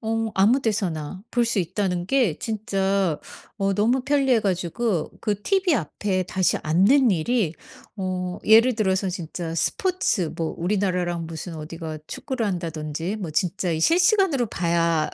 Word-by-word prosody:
어 225 0 -1
아무 220 +8 +4
데서나 185 -6 -2
볼 240 -1 +3
수 230 -2 0
있다는 180 0 -1
게 240 - +2
진짜 195 -6 0 0.4
어 195 -1 0
너무 235 +6 +2
편리해 270 -3 +3
가지고 185 -1 -1
그 205 -2 -2
tv 385 - +2
앞에 185 - -1
다시 185 0 +1
앉는 210 - +4
일이 185 +1 +1 0.4
어 185 -2 -3
예를 225 +3 +6
들어서 190 -3 +1
진짜 170 -2 -5
스포츠 360 - 0
뭐 165 -1 -2
우리나라랑 180 -2 -1
무슨 165 +1 -7
어디가 160 0 -6
축구를 260 -5 -3
한다든지 165 0 -3
뭐 180 -7 -5
진짜 180 +1 0
이 160 - -2
실시간으로 350 - +3
봐야 170 -4 0
190 Hz, 295 characters per minute, -24 LUFS, 170-225 Hz, 0.4 s, 예를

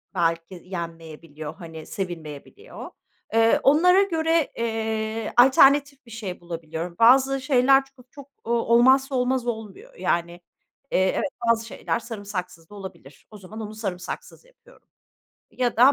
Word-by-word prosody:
belki 165 +1 -1
yenmeyebiliyor. 165 -4 -8
Hani, 165 -4 -10
sevilmeyebiliyor. 175 - -8 0.4
Eee, 225 0 +4
onlara 360 +7 +5
göre, 325 -4 0
eee, 220 -1 -3
alternatif 275 +2 +5
bir 235 - -15
şey 210 -5 -6
bulabiliyorum. 170 0 -6
Bazı 265 +3 +5
şeyler 270 0 +4
çok 250 0 -20
çok, 280 -2 -12 0.2
ooo, 230 - -5 0.2
olmazsa 265 +3 +4
olmaz 250 0 0
olmuyor. 235 - -6
Yani, 170 - -1 0.6
eee, - - +2 0.2
evet, 295 - -1 0.2
bazı 230 -1 +2
şeyler 230 - -3
sarımsaksız 195 -7 -7
da 205 - -13
olabilir. 190 -8 -12
O 210 - -11
zaman 205 +3 -10
onu 215 0 -7
sarımsaksız 195 - -6
yapıyorum - - -23 0.6
ya 245 -3 -1
da 255 +4 +7
225 Hz, 130 wpm, -24 LUFS, 180-265 Hz, 0.6 s, da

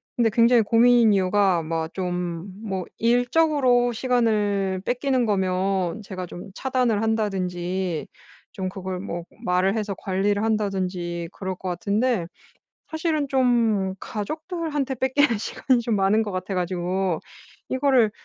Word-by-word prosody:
근데 235 -2 +3
굉장히 235 +1 +5
고민인 230 0 +5
이유가 190 -2 +2
막 160 0 -3
좀 180 -2 -2 0.3
뭐 190 -4 -3
일적으로 245 +1 +3
시간을 210 -6 +1
뺏기는 250 0 +1
거면 190 -1 0
제가 185 -2 -6
좀 175 +2 -9
차단을 250 -5 0
한다든지 185 -5 -1 0.4
좀 185 -1 -4
그걸 185 -1 -5
뭐 175 -3 -5 0.2
말을 185 +3 +2
해서 210 -2 -2
관리를 200 +2 0
한다든지 185 -5 -1
그럴 190 -1 -4
것 185 0 -5
같은데 205 +3 0 0.6
사실은 315 -2 -1
좀 230 -7 +2
가족들한테 310 - -3
뺏기는 260 -2 +2
시간이 250 +3 0
좀 230 -2 0
많은 200 +3 +3
것 210 - -4
같아 185 +1 -3
가지고 180 0 -1 0.5
이거를 260 -4 +3
205 Hz, 275 characters per minute, -24 LUFS, 185-245 Hz, 0.6 s, 굉장히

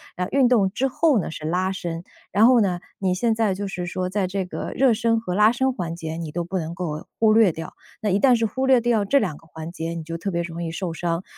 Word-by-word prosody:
然 180 0 -2
运 270 -2 +4
动 215 -6 +3
之 255 +6 0
后 300 -2 +3
呢， 170 - -4
是 155 - -7
拉 180 +4 0
伸。 170 -3 -5 0.3
然 205 +4 +5
后 250 -1 +6
呢， 180 -4 0 0.2
你 190 -2 +1
现 225 +5 +1
在 220 -3 +1
就 200 +2 -4
是 180 -2 -4
说 180 +1 -3
在 195 0 0
这 190 +1 -2
个 180 - -5
热 260 -2 +4
身 230 +1 +1
和 200 -5 -4
拉 210 +2 +5
伸 265 +2 +1
环 170 -7 -4
节 160 -2 -5
你 165 -2 -5
都 175 +2 -2
不 185 +3 -3
能 165 0 -4
够 155 -4 -4
忽 220 -1 +5
略 220 -4 +5
掉， 160 0 -8 0.3
那 215 - 0
一 195 +1 +2
旦 255 0 +5
是 225 - +1
忽 260 +5 -2
略 260 -2 +5
掉 230 -3 +1
这 280 +8 +4
两 180 - -2
个 - - -20
环 160 +1 -8
节 165 -2 -4
你 165 -1 -5
就 165 +1 -5
特 195 +4 -3
别 170 -1 -1
容 170 0 -5
易 165 - -3
受 175 +1 -3
伤。 170 +1 -2
190 Hz, 295 characters per minute, -23 LUFS, 170-225 Hz, 0.3 s, 后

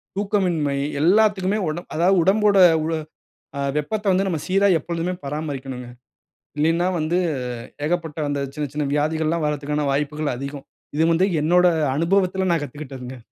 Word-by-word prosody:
தூக்கமின்மை 180 -8 0 0.2
எல்லாத்துக்குமே. 200 +2 +3
உடம் 160 +3 -4
அதாவது 180 +4 +3
உடம்போட 205 +2 +3 0.3
உ - - -1 0.7
ஆ - - -2 0.2
வெப்பத்த 210 +9 -2
வந்து 190 +1 +2
நம்ம 175 -4 -1
சீரா 195 +2 +3
எப்பொழுதுமே 170 +3 -3
பராமரிக்கனுங்க. 135 -4 -5 0.7
இல்லீனா 165 +4 +2
வந்து 160 +3 0 0.7
ஏகப்பட்ட 165 -1 -2
அந்த 145 0 -1
சின்ன 150 0 -3
சின்ன 150 0 -1
வியாதிகள்ல்லாம் 155 +2 0
வர்றதுக்கான 150 0 -1
வாய்ப்புகள் 150 0 -1
அதிகம். 140 +1 -7 0.3
இது 155 - +2
வந்து 175 +3 +3 0.2
என்னோட 180 +4 +4 0.3
அனுபவத்துல 185 +3 +1
நான் 165 -3 +1
கத்துகிட்டதுங்க. 130 -3 -8
160 Hz, 130 wpm, -22 LUFS, 145-185 Hz, 0.7 s, என்னோட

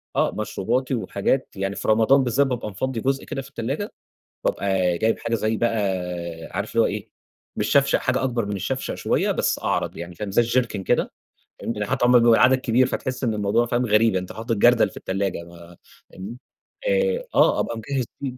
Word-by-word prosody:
آه، - - +2
مشروباتي 125 +5 -1
وحاجات، 110 +4 -1
يعني 95 0 -2
في - - -5
رمضان 115 +5 +4
بالذات 130 +3 +2
بابقى 125 -4 -3
مفَضي 115 +4 -3
جُزء 135 +2 -1
كده 135 - -4
في 135 - -13
التلاجة، 140 - -4 0.5
وبابقى 95 -3 +1
جايب 115 0 +1
حاجة 115 - -2
زي 110 0 0
بقى 115 -1 0 0.7
عارف - - -3
اللي - - +6
هُو - - +3
إيه - - -4 0.5
مش - - -1
شفشق، 140 0 +4
حاجة 130 0 0
أكبر 120 -4 -1
من 100 0 -3
الشفشق 95 - -3
شوية، - - 0
بس - - 0
أعرض - - -1
يعني 85 +1 -7
فاهم، 105 +3 -5
زي 120 - +4
الجِركِن 115 -4 0 0.8
فهمت، 115 - -4
يعني 105 - -1
حتي 125 +3 0
لما 125 0 +6
يبقى 120 0 +5
العدد 125 +3 +5
كبير، 125 +1 +2
فتحس 130 0 -4
إن 115 - +1
الموضوع 105 +3 +1
فاهم 120 +1 0
غريب، 105 -2 +3
أنت 90 0 -3
حاطط 115 +1 -2
جردل 120 -1 +5
في - - -14
التلاجة 95 -2 -2
بقى 85 0 -14 0.3
فاهمني؟ 105 +6 -8 0.5
آآ 485 0 +1
آه - - +4
أبقى 115 - -2
مجهز 130 +3 -2 0.2
في 130 -2 -4
115 Hz, 195 wpm, -23 LUFS, 100-130 Hz, 0.8 s, اللي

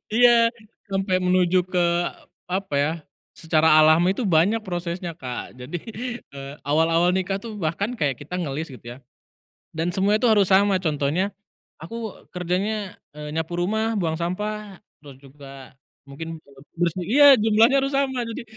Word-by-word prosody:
Iya, 235 -1 +6 0.4
sampai 195 -1 0
menuju 180 0 +2
ke, 180 -1 +1 0.6
apa 190 -3 -3
ya, 145 +2 +1 0.4
secara 160 -1 +1
alami 165 +5 +5
itu 255 - -3
banyak 195 +5 +2
prosesnya, 175 -2 -4
Kak, 125 -4 -8
jadi, 150 +7 -6 0.5
eee, 140 0 -8
awal-awal 165 +4 +2
nikah 190 +1 -1
tuh 215 -3 -7
bahkan 195 +9 -2
kayak 140 -4 +1
kita 180 +5 -5
ngelis 155 -1 -4
gitu 120 -1 -10
ya, - - -14 0.7
dan 170 +3 -3
semua 205 +2 +2
itu 245 - +2
harus 210 -4 +4
sama, 195 +1 +4
contohnya, 155 +5 0 0.5
aku 225 +4 -7
kerjanya, 190 +3 -2 0.2
eee, 150 0 -8
nyapu 160 +2 -3
rumah, 220 +4 0
buang 165 -3 -1
sampah 200 +4 -4 0.2
terus 140 -3 -13
juga 135 -1 -13 0.3
mungkin, 165 +4 -7
eee, 140 -3 -19 0.2
bersih 175 +1 0
iya, 285 +6 +6
jumlahnya 225 +5 +4
harus 275 - -1
sama 265 -2 0
jadi, 230 +4 -6
180 Hz, 150 wpm, -23 LUFS, 155-210 Hz, 0.7 s, Iya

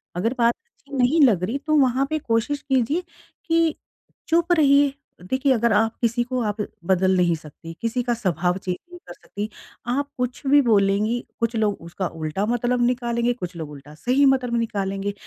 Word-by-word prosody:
अगर 220 +7 0
बात 235 0 +4
अच्छी 290 - -12
नहीं 265 +6 +3
लग 200 -8 +2
रही, 225 +9 -1
तो 305 +2 -1
वहाँ 260 0 +3
पे 310 - 0
कोशिश 240 +3 -1
कीजिए 270 +5 0 0.4
कि 330 -1 +2 0.5
चुप 340 +2 +2
रहिए, 285 -3 +4 0.3
देखिए 260 +7 0
अगर 235 -2 +2
आप 225 +2 +2
किसी 235 0 +1
को 255 0 -2
आप 210 -1 -2 0.3
बदल 190 0 +3
नहीं 175 -2 +3
सकती, 160 +2 -11
किसी 230 +2 -1
का 240 0 0
स्वभाव 180 -5 0
चेंज 185 -1 -3
नहीं 355 0 -11
कर 175 - -8
सकती। 205 +4 -6 0.4
आप 275 +4 0
कुछ 250 -1 -3
भी 285 +1 +6
बोलेंगी, 210 0 +2 0.2
कुछ 230 0 0
लोग 215 -2 +1
उसका 170 +3 -4
उल्टा 160 +4 -3
मतलब 240 +1 0
निकालेंगे, 240 -1 0
कुछ 180 -7 -7
लोग 160 -3 -6
उल्टा 145 +1 -12
सही 255 - +2
मतलब 255 -3 +2
निकालेंगे। 200 -2 -2
235 Hz, 180 wpm, -23 LUFS, 195-265 Hz, 0.5 s, भी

